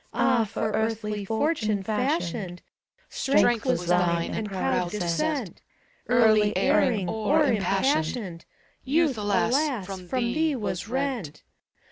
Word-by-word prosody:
Ah! 245 Hz, -4 st, +2 dB
for 215 Hz, +1 st, -3 dB
earthly 215 Hz, -1 st, -2 dB
fortune 220 Hz, -3 st, 0 dB
fashioned, 210 Hz, -, -2 dB, 0.4 s
Strength 245 Hz, -4 st, +2 dB
was 180 Hz, -9 st, 0 dB
thine, 175 Hz, -1 st, +1 dB
and 215 Hz, -, -3 dB
proud 185 Hz, -2 st, -1 dB
descent: 210 Hz, -, -2 dB, 0.5 s
Early 215 Hz, -3 st, +4 dB
erring, 240 Hz, -9 st, +2 dB
o'er 220 Hz, -, +1 dB
impassioned, 195 Hz, -, 0 dB, 0.4 s
Youth, 295 Hz, 0 st, +2 dB
alas! 225 Hz, +3 st, 0 dB
from 185 Hz, -2 st, -8 dB
thee 265 Hz, -, 0 dB
was 205 Hz, -5 st, -4 dB
rent. 255 Hz, -, -3 dB
220 Hz, 105 wpm, -26 LUFS, 190-260 Hz, 0.5 s, Early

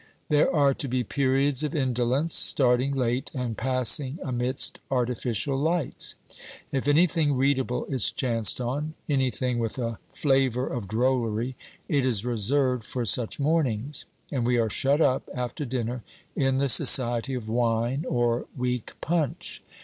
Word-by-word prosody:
There 150 Hz, -1 st, +3 dB
are 140 Hz, -3 st, +3 dB
to 140 Hz, -, 0 dB
be 125 Hz, 0 st, -1 dB
periods 135 Hz, +3 st, +1 dB
of 150 Hz, +2 st, -3 dB
indolence, 130 Hz, +3 st, 0 dB
starting 130 Hz, +1 st, +3 dB
late 125 Hz, 0 st, -1 dB
and 125 Hz, -3 st, -3 dB
passing 130 Hz, +3 st, +1 dB
amidst 130 Hz, +1 st, 0 dB
artificial 125 Hz, -1 st, -1 dB
lights. 160 Hz, +2 st, 0 dB, 0.6 s
If 135 Hz, 0 st, -2 dB
anything 155 Hz, -1 st, +3 dB
readable 130 Hz, -1 st, 0 dB
is 130 Hz, -3 st, 0 dB
chanced 115 Hz, -4 st, +1 dB
on, 145 Hz, +6 st, -3 dB
anything 130 Hz, -3 st, 0 dB
with 115 Hz, +1 st, -3 dB
a 115 Hz, -3 st, -3 dB
flavour 135 Hz, -3 st, +1 dB
of 120 Hz, -6 st, -5 dB
drollery, 120 Hz, +1 st, -1 dB, 0.3 s
it 140 Hz, -3 st, +1 dB
is 120 Hz, -4 st, +1 dB
reserved 125 Hz, +2 st, 0 dB
for 120 Hz, +2 st, -4 dB
such 115 Hz, +4 st, +1 dB
mornings, 140 Hz, -3 st, 0 dB, 0.3 s
and 130 Hz, -4 st, -1 dB
we 120 Hz, +1 st, +1 dB
are 115 Hz, -2 st, 0 dB
shut 140 Hz, +7 st, +1 dB
up 135 Hz, -3 st, +1 dB
after 125 Hz, +4 st, -4 dB
dinner 120 Hz, -1 st, -3 dB, 0.3 s
in 135 Hz, -1 st, +1 dB
the 140 Hz, +1 st, +1 dB
society 120 Hz, 0 st, +4 dB
of 120 Hz, -4 st, -6 dB
wine 120 Hz, +4 st, 0 dB
or 120 Hz, -1 st, 0 dB
weak 125 Hz, -2 st, -3 dB
punch. 160 Hz, -4 st, -2 dB
130 Hz, 140 wpm, -26 LUFS, 120-140 Hz, 0.6 s, society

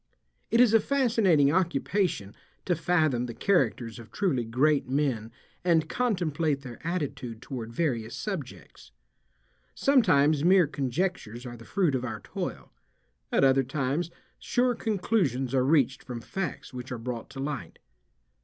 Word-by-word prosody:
It 230 Hz, -, +3 dB
is 245 Hz, -3 st, +6 dB
a 225 Hz, -, +7 dB
fascinating 220 Hz, -, +3 dB
occupation 175 Hz, -, 0 dB, 0.3 s
to 180 Hz, -, +2 dB
fathom 155 Hz, -7 st, +1 dB
the 115 Hz, -, -7 dB
characters 125 Hz, -, +1 dB
of 115 Hz, -1 st, -12 dB
truly 165 Hz, -12 st, 0 dB
great 135 Hz, +4 st, +2 dB
men 130 Hz, -6 st, 0 dB, 0.3 s
and 165 Hz, -3 st, +3 dB
contemplate 165 Hz, -, 0 dB
their 125 Hz, -3 st, -9 dB
attitude 140 Hz, -9 st, -3 dB
toward 115 Hz, -2 st, -6 dB
various 115 Hz, -6 st, -1 dB
subjects. 175 Hz, -, -7 dB, 0.8 s
Sometimes 155 Hz, -, +4 dB
mere 180 Hz, 0 st, +6 dB
conjectures 140 Hz, -, -3 dB
are 120 Hz, -1 st, -7 dB
the 115 Hz, 0 st, -13 dB
fruit 185 Hz, -8 st, +1 dB
of 130 Hz, -1 st, -1 dB
our 110 Hz, -4 st, -4 dB
toil. -, -, -6 dB, 0.6 s
At -, -, +3 dB
other 135 Hz, 0 st, +5 dB
times 140 Hz, +5 st, -1 dB, 0.3 s
sure 245 Hz, 0 st, +1 dB
conclusions 180 Hz, -, 0 dB
are 130 Hz, -1 st, +3 dB
reached 135 Hz, -2 st, +2 dB
from 125 Hz, -2 st, -6 dB
facts 175 Hz, -, -5 dB
which 125 Hz, 0 st, -7 dB
are 125 Hz, -, -3 dB
brought 115 Hz, 0 st, -5 dB
to 135 Hz, 0 st, -9 dB
light. 140 Hz, 0 st, -4 dB
145 Hz, 140 wpm, -28 LUFS, 125-180 Hz, 0.8 s, a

